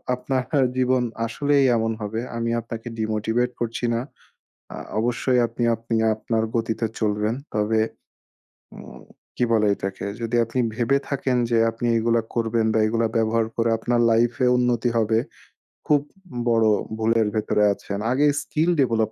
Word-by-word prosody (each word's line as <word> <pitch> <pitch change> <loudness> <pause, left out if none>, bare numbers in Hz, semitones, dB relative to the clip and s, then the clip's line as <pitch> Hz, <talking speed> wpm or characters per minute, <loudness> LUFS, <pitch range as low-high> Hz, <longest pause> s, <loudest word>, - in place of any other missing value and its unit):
আপনার 125 0 -2 0.3
জীবন 130 0 +2 0.2
আসলেই 140 +4 +2
এমন 115 0 0
হবে। 105 +2 -3 0.2
আমি 115 0 -1
আপনাকে 115 0 -8
ডিমোটিভেট 110 +3 0
করছি 115 0 -2
না। 115 - 0 0.7
আ - - -6 0.2
অবশ্যই 125 +2 +1
আপনি 120 - -4
আপনি 115 +1 -4 0.2
আপনার 110 +1 -1
গতিতে 115 0 -1
চলবেন। 105 +1 0 0.2
তবে 110 +1 +1 1.0
উম - - -11 0.4
কি - - 0
বলে 110 -2 +3
এটাকে 95 0 -5 0.2
যদি 115 +1 -2
আপনি 115 +3 -3 0.2
ভেবে 125 +3 +2
থাকেন 130 -2 0
যে 120 - +2
আপনি 115 +1 -3
এগুলা 115 +1 +2
করবেন 115 -1 +1
বা 110 - +2
এগুলা 115 +1 +1
ব্যবহার 115 0 +1
করে 115 0 +1
আপনার 120 +2 0
লাইফ 115 +1 +3
এ - - +4
উন্নতি 125 -1 +1
হবে। 110 0 +2 0.7
খুব 145 -2 +4 0.5
বড় 115 -1 +3 0.3
ভুলের 110 0 +2
ভেতরে 105 -1 +1
আছেন। 100 0 -6
আগে 140 +3 +3 0.2
স্কিল 160 +3 0
ডেভেলপ 115 -4 +2
115 Hz, 150 wpm, -23 LUFS, 110-125 Hz, 1.0 s, এ